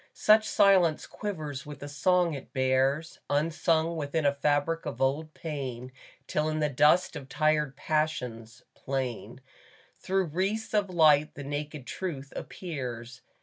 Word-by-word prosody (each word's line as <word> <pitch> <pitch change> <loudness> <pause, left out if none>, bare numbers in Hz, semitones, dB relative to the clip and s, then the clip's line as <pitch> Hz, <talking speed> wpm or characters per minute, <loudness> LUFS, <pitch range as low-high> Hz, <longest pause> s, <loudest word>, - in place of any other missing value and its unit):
Such 215 +1 +4
silence 190 -6 +4
quivers 155 -9 -5
with 150 -1 -9
the 145 - -8
song 175 +3 +2
it 140 -2 -8
bears, 135 +4 +1
Unsung 160 +2 +1
within 155 0 -2
a 140 - +4
fabric 145 +3 0
of 145 - -5
old 145 +4 0
pain, 130 -5 -5 0.3
Till 155 +2 0
in 155 0 -1
the 150 -1 +1
dust 150 +6 +3
of 135 -3 -8
tired 150 -2 +1
passions, 125 -7 -2
plain 130 -3 -4 0.6
Through 190 0 0
wreaths 200 +6 -1
of 205 -2 +2
light, 155 -4 +4
the 145 - -7
naked 145 0 -5
truth 140 -7 -5
appears. 125 -8 -6
150 Hz, 140 wpm, -28 LUFS, 135-165 Hz, 0.6 s, Such